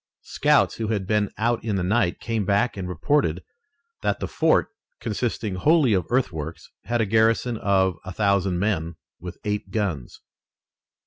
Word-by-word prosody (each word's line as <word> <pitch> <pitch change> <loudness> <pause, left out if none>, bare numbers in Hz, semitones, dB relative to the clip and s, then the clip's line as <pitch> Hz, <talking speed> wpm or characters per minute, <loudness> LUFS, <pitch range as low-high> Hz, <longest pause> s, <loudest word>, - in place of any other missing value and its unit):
Scouts - - +2
who 110 - -2
had 105 -3 -1
been 105 0 +1
out 115 +2 0
in 110 -3 -1
the 95 - -1
night 95 -1 +1
came 115 -3 -2
back 100 +5 +1
and 95 -2 -5
reported 90 - 0 0.6
that - - 0
the - - -3
fort, - - +2 0.3
consisting 110 -2 -2
wholly 145 - +3
of 90 -4 0
earthworks, 85 - -2
had 120 -1 0
a - - +2
garrison 110 +3 +2
of 95 -4 +1
a 95 - -7
thousand 100 -2 +1
men 85 -4 -1 0.2
with 90 0 -8
eight 105 -1 -2
guns. 95 - -3
100 Hz, 155 wpm, -24 LUFS, 90-115 Hz, 0.6 s, wholly